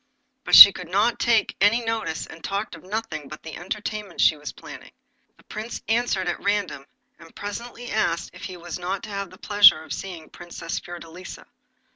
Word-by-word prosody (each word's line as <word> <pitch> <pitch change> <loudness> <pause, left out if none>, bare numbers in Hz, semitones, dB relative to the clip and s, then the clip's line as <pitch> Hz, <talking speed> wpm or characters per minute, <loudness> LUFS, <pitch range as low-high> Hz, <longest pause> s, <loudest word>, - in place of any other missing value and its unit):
But - - +4
she 200 - +13
would 180 -2 -9
not 210 +6 +1
take 230 -2 +1
any 230 +4 +3
notice, 220 -9 -3
and 160 - -14
talked 200 +1 -3
of 165 - -10
nothing 210 -6 -5
but 155 - -11
the 160 - -8
entertainments 205 +1 -4
she 160 - +5
was 150 0 -8
planning. - - -13 0.4
The - - -23
Prince 220 +2 -7
answered 225 -5 0
at 175 - -3
random, 200 -9 -2 0.3
and 165 -1 -17
presently 235 +4 -7
asked 170 -6 -1
if 180 - -10
he 185 - -8
was 175 0 -7
not 185 +2 -4
to - - -8
have 200 -1 -5
the 185 - -16
pleasure 205 -6 +5
of - - -7
seeing 180 -4 -7
the - - -20
Princess 170 -1 -7
Fiordelisa. 175 +1 -10
190 Hz, 190 wpm, -23 LUFS, 170-215 Hz, 0.4 s, she